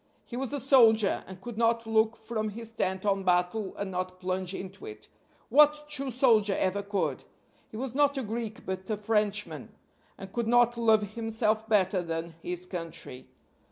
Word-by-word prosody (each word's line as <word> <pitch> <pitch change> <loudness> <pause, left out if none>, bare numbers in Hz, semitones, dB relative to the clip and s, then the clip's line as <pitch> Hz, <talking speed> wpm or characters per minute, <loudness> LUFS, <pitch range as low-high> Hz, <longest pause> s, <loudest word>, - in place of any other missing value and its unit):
He 235 - -8
was 265 +1 -3
a 290 - -2
soldier, 225 -6 +4
and 190 -1 -10
could 235 -1 -7
not 230 0 +2
look 220 0 +2
from 220 -1 -3
his 225 +2 -7
tent 190 -3 -2
on 195 -1 +2
battle 180 +3 0
and 200 -1 -4
not 185 0 -4
plunge 185 0 -2
into 190 - -8
it. 420 -1 -10 0.4
What 300 +1 +5
true 275 -2 -2
soldier 225 -5 +3
ever 190 +2 0
could? 200 0 -2 0.5
He 215 - -9
was 255 0 -3
not 285 0 +2
a 265 - -1
Greek 225 0 -5
but 190 +1 -5
a 215 - -1
Frenchman 210 -1 -1 0.5
and 190 -1 -10
could 235 -2 -1
not 240 0 +4
love 220 -3 +2
himself 220 -1 0
better 195 -3 +3
than 165 0 -4
his 180 +1 -4
country. 165 -8 -7
215 Hz, 175 wpm, -28 LUFS, 190-235 Hz, 0.5 s, What